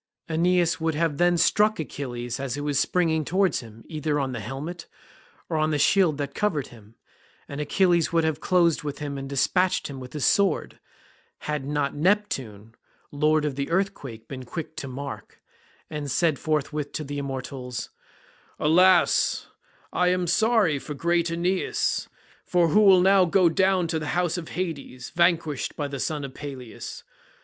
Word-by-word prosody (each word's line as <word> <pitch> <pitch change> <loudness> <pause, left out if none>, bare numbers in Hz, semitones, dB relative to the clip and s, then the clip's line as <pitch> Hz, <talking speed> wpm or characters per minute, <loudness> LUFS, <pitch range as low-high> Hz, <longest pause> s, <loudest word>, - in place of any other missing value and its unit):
Aeneas 175 +1 +2
would 160 -1 0
then 165 +2 +2
have 170 - 0
struck 210 +3 +3
Achilles 120 -5 -5
as 135 -2 -3
he 145 - -4
was 145 -1 0
springing 160 -1 +1
towards 185 +1 +1
him, 115 -2 -12
either 150 -2 -1
on 135 -2 -1
the 120 - -4
helmet, 140 - -6 0.6
or 160 - -2
on 155 0 +2
the 150 - +1
shield 170 -1 +3
that 140 -1 -4
covered 165 -10 -1
him, 110 -2 -16 0.5
and 145 +1 -5
Achilles 175 +1 +2
would 165 -1 +2
have 160 -2 0
closed 170 -3 +2
with 145 -1 -5
him 145 -2 -5
and 135 0 -6
despatched 180 +7 +1
him 135 - -7
with 125 -1 -10
his 150 -3 -1
sword, 195 -5 +1 0.6
had 150 -3 -3
not 145 -1 -1
Neptune 135 - -1 0.4
lord 150 +1 +2
of 150 - -1
the 140 +1 -3
earthquake 145 - -2
been 130 -2 -7
quick 155 +5 -6
to 140 - -5
mark, 140 +2 -7 0.5
and 150 -2 -5
said 160 -1 +1
forthwith 150 -1 -2
to 155 - -3
the 145 0 -5
immortals, 130 -3 -5 0.7
"Alas, 180 +3 +4 0.4
I 180 - +2
am 180 0 +1
sorry 215 -5 +2
for 150 +1 -7
great 170 +3 +1
Aeneas, 175 +3 -1 0.4
who 175 +3 +4
will 190 -3 +7
now 190 0 +5
go 180 0 +4
down 190 +1 +2
to 160 - 0
the 155 - -5
house 175 -2 +1
of 175 -3 -5
Hades, 145 -8 -5
vanquished 170 -5 +1
by 145 - -2
the 140 -1 -6
son 150 +1 -2
of 135 - -9
Peleus. 135 -5 -8
155 Hz, 165 wpm, -25 LUFS, 140-175 Hz, 0.7 s, will